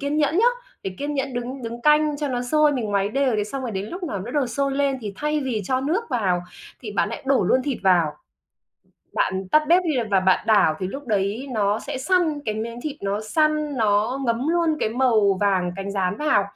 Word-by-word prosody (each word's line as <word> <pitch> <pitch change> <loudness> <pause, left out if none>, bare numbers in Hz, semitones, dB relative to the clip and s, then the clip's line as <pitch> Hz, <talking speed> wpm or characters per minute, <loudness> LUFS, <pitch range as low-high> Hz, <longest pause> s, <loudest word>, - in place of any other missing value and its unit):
kiên 285 +1 -1
nhẫn 305 +1 +2
nhớ, 425 - +4 0.4
phải 190 - -5
kiên 290 +1 -3
nhẫn 270 -2 -2
đứng 250 +2 -5
đứng 235 +1 -6
canh 300 0 +4
cho 290 -1 -2
nó 245 -1 -2
sôi. 300 +4 +3
Mình 250 -5 -2
ngoáy 200 0 +1
đều, 260 0 +1
thế 210 - 0
xong 265 +5 -5
rồi 245 - -3
đến 195 0 -4
lúc 355 - -7
nào 210 - -3
nó 230 +6 -6
đầu 280 -2 +1
sôi 275 +3 -1
lên 275 -1 0
thì 210 -3 -5
thay 300 0 -1
vì 250 -6 -2
cho 260 +3 0
nước 345 - 0
vào 185 -8 +1 0.4
thì 215 -4 -7
bạn 205 - +1
lại 230 - -6
đổ 270 -1 +3
luôn 260 - +3
thịt 275 -3 -2
vào. 175 -5 +3 1.0
Bạn 190 0 -1
tắt 305 0 +5
bếp 355 +2 +5
đi 340 - -1 0.2
và 195 - +5
bạn 185 0 +2
đảo 205 -8 +4
thì 185 - -2
lúc 275 +5 -7
đấy 210 +5 -1
nó 210 0 +1
sẽ - - -5
săn, 325 0 +1
cái 215 -1 -1
miếng 230 +2 -5
thịt 300 -1 -5
nó 200 +1 -1
săn 305 +4 0
nó 215 +4 +1
ngấm 235 +3 0
luôn 335 -1 +2
cái - - 0
màu 220 -5 +2
vàng 185 -3 +2
cánh 195 0 -5
gián 190 -1 -1
vào. 300 -10 +2
245 Hz, 235 wpm, -23 LUFS, 205-290 Hz, 1.0 s, tắt